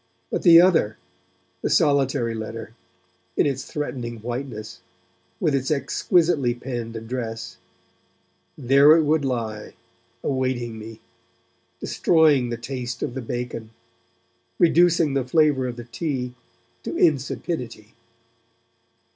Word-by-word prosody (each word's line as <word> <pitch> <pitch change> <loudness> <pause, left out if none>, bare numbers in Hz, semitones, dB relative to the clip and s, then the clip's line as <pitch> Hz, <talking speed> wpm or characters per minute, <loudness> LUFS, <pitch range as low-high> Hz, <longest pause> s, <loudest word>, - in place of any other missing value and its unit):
But - - -1
the 165 -1 +8
other, 165 - +3 0.6
the - - -1
solitary 135 -4 +2
letter, 115 0 -6 0.6
in - - +4
its 135 -2 -2
threatening 125 -5 -5
whiteness, 115 -1 -6 0.6
with 150 - +1
its 135 -1 0
exquisitely 150 -2 +1
penned 120 -2 -5
address 115 0 -5 1.0
there 140 +3 +6
it 160 - +3
would 150 0 +2
lie 115 -5 -4 0.5
awaiting 130 -4 -2
me, 110 +1 -10 0.8
destroying 150 -7 +3
the 120 - -3
taste 120 0 -5
of - - -3
the 135 - -4
bacon, 120 -1 -5 0.9
reducing 170 -3 +4
the 135 -1 +1
flavour 140 -1 +2
of 120 - -5
the 120 - -8
tea 125 0 -4 0.5
to - - -5
insipidity. 130 -6 -1
125 Hz, 110 wpm, -23 LUFS, 115-145 Hz, 1.0 s, the